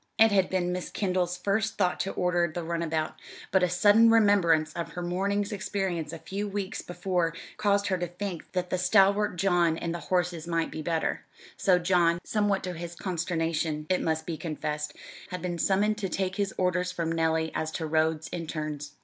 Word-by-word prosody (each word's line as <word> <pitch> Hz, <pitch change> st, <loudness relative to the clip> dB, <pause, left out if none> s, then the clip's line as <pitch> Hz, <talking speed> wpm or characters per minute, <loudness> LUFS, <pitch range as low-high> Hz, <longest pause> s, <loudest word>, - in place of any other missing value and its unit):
It 225 Hz, 0 st, +6 dB
had 190 Hz, -2 st, +3 dB
been 180 Hz, -1 st, 0 dB
Miss 180 Hz, 0 st, -3 dB
Kendall's 180 Hz, -3 st, -1 dB
first 220 Hz, +2 st, 0 dB
thought 180 Hz, -3 st, +1 dB
to 195 Hz, -, -1 dB
order 180 Hz, -1 st, +1 dB
the 175 Hz, +2 st, -4 dB
runabout, 165 Hz, -1 st, -2 dB, 0.3 s
but 190 Hz, -, +4 dB
a 180 Hz, -, +3 dB
sudden 205 Hz, +6 st, +6 dB
remembrance 185 Hz, -8 st, +4 dB
of 170 Hz, -, -5 dB
her 180 Hz, -, -4 dB
morning's 200 Hz, +4 st, -1 dB
experience 190 Hz, -6 st, -2 dB
a 165 Hz, -, -6 dB
few 200 Hz, +5 st, -4 dB
weeks 200 Hz, -1 st, -3 dB
before 175 Hz, -2 st, -1 dB, 0.2 s
caused 200 Hz, -1 st, +2 dB
her 185 Hz, -2 st, 0 dB
to 175 Hz, -, -1 dB
think 180 Hz, 0 st, -6 dB
that 180 Hz, -1 st, -2 dB
the 185 Hz, -, 0 dB
stalwart 200 Hz, +2 st, +4 dB
John 175 Hz, -3 st, +2 dB
and 170 Hz, 0 st, -3 dB
the 170 Hz, -, -4 dB
horses 175 Hz, -2 st, 0 dB
might 165 Hz, -1 st, 0 dB
be 155 Hz, -, -5 dB
better; 165 Hz, 0 st, -1 dB, 0.3 s
so 185 Hz, -3 st, +3 dB
John, 175 Hz, -1 st, +3 dB
somewhat 205 Hz, -2 st, 0 dB
to 180 Hz, -, -3 dB
his 170 Hz, 0 st, -7 dB
consternation, 165 Hz, -4 st, -1 dB
it 185 Hz, -, +2 dB
must 160 Hz, 0 st, -1 dB
be 165 Hz, -2 st, -4 dB
confessed, 150 Hz, -2 st, -4 dB, 0.3 s
had 180 Hz, -1 st, -5 dB
been 175 Hz, -1 st, -3 dB
summoned 210 Hz, +4 st, +2 dB
to 195 Hz, -3 st, -2 dB
take 190 Hz, +1 st, -2 dB
his 200 Hz, -1 st, 0 dB
orders 180 Hz, 0 st, +1 dB
from 170 Hz, -2 st, -2 dB
Nellie 160 Hz, -1 st, +1 dB
as 160 Hz, -, -2 dB
to 160 Hz, -, -3 dB
roads 160 Hz, 0 st, +1 dB
and 165 Hz, -2 st, -4 dB
turns. 150 Hz, -2 st, -4 dB
180 Hz, 190 wpm, -28 LUFS, 165-195 Hz, 0.3 s, It